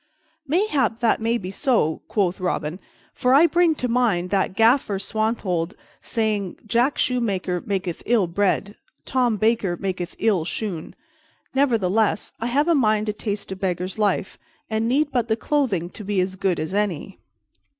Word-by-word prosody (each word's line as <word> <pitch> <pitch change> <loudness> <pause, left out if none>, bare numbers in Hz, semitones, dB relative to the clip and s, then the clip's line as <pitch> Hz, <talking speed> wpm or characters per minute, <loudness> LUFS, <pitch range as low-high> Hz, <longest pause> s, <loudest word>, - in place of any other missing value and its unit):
"Mayhap 295 - +1
that 230 -1 +2
may 230 +1 +1
be 185 -4 -6
so," 195 - +1
quoth 195 -2 0
Robin, 170 -2 -2 0.3
"for 250 +1 +3
I 305 +4 +7
bring 340 -1 +3
to 250 - -2
mind 225 -8 +1
that 190 -1 +1
Gaffer 225 -2 +3
Swanthold 195 -5 -1 0.3
sayeth 215 -5 -2
Jack 240 +6 +1
Shoemaker 195 -8 0
maketh 190 -4 -3
ill 230 -5 +3
bread; 200 +3 0 0.3
Tom 245 -4 +1
Baker 215 -4 +1
maketh 185 -2 -4
ill 205 -6 +2
shoon. 175 -1 -4 0.6
Nevertheless, 225 -6 +1
I 230 - -2
have 285 +6 +1
a 340 - +4
mind 215 -7 +2
to 210 - -1
taste 205 -2 -4
a - - -3
beggar's 185 +1 -3
life, 200 -2 0 0.3
and 220 +1 0
need 290 +4 +1
but 245 -3 0
the 220 0 +1
clothing 230 - 0
to 215 - -9
be 205 -1 -1
as 185 +1 0
good 190 -2 0
as 155 +4 -3
any." 195 -2 -2
210 Hz, 160 wpm, -23 LUFS, 185-240 Hz, 0.6 s, I